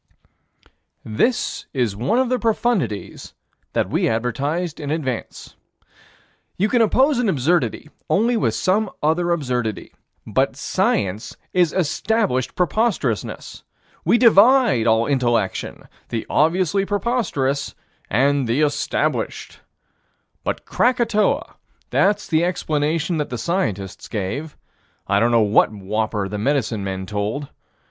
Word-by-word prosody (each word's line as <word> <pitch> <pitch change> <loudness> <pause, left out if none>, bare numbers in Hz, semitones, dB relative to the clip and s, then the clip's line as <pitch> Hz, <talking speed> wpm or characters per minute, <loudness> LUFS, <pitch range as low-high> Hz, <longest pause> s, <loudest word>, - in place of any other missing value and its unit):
This 220 - -1
is 120 -6 0
one 125 - 0
of 260 -1 +2
the 255 0 +1
profundities 215 - -1 0.4
that - - 0
we - - +1
advertised 140 +9 -2
in 145 -2 -5
advance. 140 -6 -4 1.0
You 205 +4 +1
can 245 +1 +3
oppose 260 +5 +3
an 240 -4 +1
absurdity 155 0 0 0.2
only 235 +4 +2
with 220 - +1
some 205 +3 +1
other 165 +3 +1
absurdity. 125 - -2 0.3
But - - 0
Science 100 +3 -1 0.2
is 175 -3 +3
established 185 - 0
preposterousness. 215 +5 -1 0.4
We - - +4
divide 230 - +5
all 110 +1 +3
intellection: 120 -7 -1 0.3
the 115 -2 -3
obviously 180 +5 +2
preposterousness 195 - -1 0.3
and 135 +3 +2
the 120 +6 +1
established. 150 -1 -1 0.8
But - - -3
Krakatoa: 235 -4 +1 0.3
that's 205 +1 +2
the 160 0 +2
explanation 160 -1 0
that 150 - -2
the 125 - -4
scientists 105 - -2
gave. 125 +9 -4 0.5
I 100 0 +2
don't 115 +3 +3
know 115 -1 +4
what 105 0 +3
whopper 105 0 -2
the 105 +1 -5
medicine 115 -4 0
men 95 -1 -4
told. 105 +8 -3
150 Hz, 115 wpm, -21 LUFS, -, 1.0 s, divide